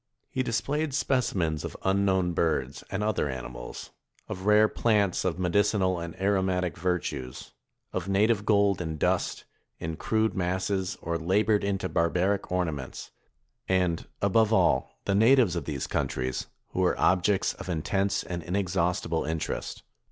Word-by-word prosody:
He 130 - 0
displayed 135 +5 -1
specimens 95 - 0
of - - -6
unknown 95 -2 +2
birds, 70 -6 -1
and 100 +2 -2
other 105 -8 0
animals; 60 -2 -7 0.4
of 95 +2 -5
rare 105 +1 +6
plants 105 -5 +1
of 90 -2 -1
medicinal 95 0 +2
and 85 +2 -7
aromatic 95 -3 +1
virtues; 80 -7 -3 0.4
of 95 +1 -3
native 105 +2 +3
gold 100 -3 +3
in 80 -2 -3
dust, - - 0 0.3
in 80 0 -4
crude 110 +3 +1
masses, 95 +1 -1
or 85 0 -1
labored 100 +5 +2
into 100 -1 -1
barbaric 90 +4 0
ornaments; 80 -7 -3 0.6
and, 90 -3 +1 0.2
above 110 +2 +3
all, 110 - +2
the 100 - +1
natives 110 -2 +5
of 85 -4 -3
these 70 -4 -3
countries, 65 0 -2 0.2
who - - -4
were 90 -1 +2
objects 95 +2 +2
of - - -9
intense 95 +4 0
and 85 -1 -5
inexhaustible 90 -2 0
interest. 80 0 -3
95 Hz, 135 wpm, -27 LUFS, 85-100 Hz, 0.6 s, rare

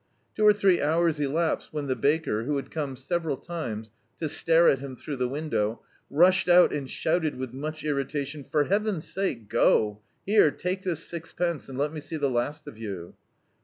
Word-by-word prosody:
Two 215 - 0
or - - +10
three 195 -3 +3
hours 160 +1 +2
elapsed 155 +3 0
when 150 -2 -3
the 130 -2 0
baker, 140 -7 +1
who 145 +1 0
bad - - -9
come 145 -4 -3
several 150 +2 -2
times 115 -12 -5 0.3
to 160 - -2
stare 165 +2 +3
at 135 - +4
him 135 -1 -7
through 140 +2 -6
the 125 0 0
window, 125 -6 -2 0.3
rushed 180 +5 +4
out 175 0 +7
and 140 -3 -3
shouted 160 -2 0
with 130 -1 -5
much 155 +3 -5
irrita 140 -1 -1
tion 145 +1 -8
— - - -32
"For 150 -1 +3
Heaven's 200 0 0
sake, 140 - -2
go: 105 0 +2 0.2
here, 205 -5 +5
take 180 +6 -3
this 170 -4 -2
six 165 -1 -7
pence, 170 -5 -2
and 130 - -7
let 145 +2 0
me 155 - -5
see 155 +2 -6
the 140 -3 0
last 145 +5 -2
of 110 - -10
you." 95 -6 -6
150 Hz, 200 wpm, -27 LUFS, 135-170 Hz, 0.3 s, or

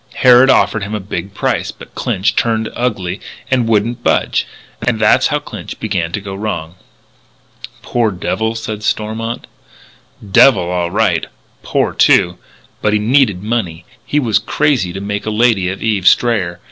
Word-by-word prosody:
Harrod 125 +1 +6
offered 115 - +3
him 100 +2 -4
a - - -2
big 100 0 -6
price. - - -1
But - - -14
Clinch 95 - -1
turned 110 -1 0
ugly 100 -7 -2 0.3
and 125 -3 +2
wouldn't 115 +2 0
budge. - - +1 0.3
And 115 -1 0
that's 105 0 +4
how - - 0
Clinch - - -8
began 80 -1 -2
to - - -1
go 100 -1 -7
wrong." 90 -5 -4 1.1
"Poor 120 -2 0
devil," 110 +4 -2
said 110 -1 -5
Stormont. 110 +2 -3 0.8
"Devil, 100 0 +5
all 90 -1 -1
right. - - +1 0.3
Poor, - - -1
too. 90 0 +3 0.4
But 105 - +1
he - - +4
needed 105 -4 +2
money. 95 -7 -3 0.2
He 150 - 0
was 115 -7 +2
crazy 135 -12 0
to 95 - -6
make 105 +1 -4
a - - +1
lady 110 -4 +2
of 95 - -5
Eve 105 -5 0
Strayer. 95 -8 +2
105 Hz, 160 wpm, -16 LUFS, 95-115 Hz, 1.1 s, Harrod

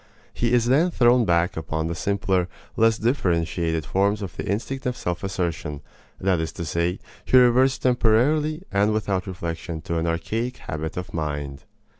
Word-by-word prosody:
He 120 -1 0
is 120 -2 +3
then 145 +9 +3
thrown 120 -6 +4
back 85 -1 +2
upon 80 0 -3
the 85 - -2
simpler, 95 -1 0 0.3
less 115 0 +3
differentiated 85 - 0
forms 100 +7 +1
of 95 - -7
the - - -5
instinct 125 +6 -2
of 125 - -2
self 90 +1 -3
assertion; 85 -6 -3 0.4
that 95 -2 +1
is 80 0 -2
to 85 - -5
say, 85 +4 0 0.3
he 130 - +4
reverts 130 +2 +5
temporarily 135 +7 +2
and 100 +2 +2
without 100 -3 -1
reflection 85 -2 -5
to 85 -2 -2
an 80 - -1
archaic 110 +10 -2
habit 80 +2 -5
of 90 - -5
mind. 75 -3 -4
95 Hz, 165 wpm, -24 LUFS, 85-120 Hz, 0.4 s, reverts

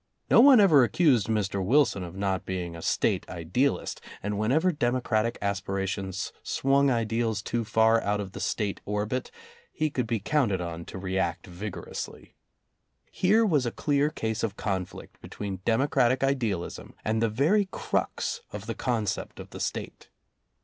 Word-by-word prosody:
No - - +8
one 265 -2 +8
ever 160 -10 +7
accused 125 - +3
Mr. 100 -3 0
Wilson 120 -3 +3
of 85 0 -8
not 95 -1 -1
being 90 -3 -4
a 85 - -8
State - - +1
idealist, 90 - -1 0.2
and 105 0 -2
whenever 150 +12 +2
democratic 120 -5 0
aspira 95 -1 -1
tions 95 0 -4
swung 140 +1 +2
ideals 115 -3 0
too 120 0 -1
far 110 +1 +3
out 105 +1 0
of 100 -2 -5
the 100 - -8
State 100 +1 -2
orbit, 105 +5 -2 0.4
he 155 -1 -1
could 125 -4 -1
be 115 -1 0
counted 115 - +1
on 85 -1 -5
to - - -8
react 95 -2 -2
vigorously. 95 +2 -7 0.8
Here 215 +5 +3
was 150 - +2
a - - -1
clear 145 +2 +1
case 110 -6 -3
of 110 -3 -2
conflict 95 -3 -4
between 100 -2 -6
democratic 125 +1 +2
idealism 120 -10 -2
and 110 +1 +1
the 115 - +2
very 165 - +2
crux - - -2
of 105 0 -7
the 115 - -3
concept 115 -5 -2
of - - -10
the - - -8
State. - - -5
110 Hz, 155 wpm, -27 LUFS, 95-130 Hz, 0.8 s, No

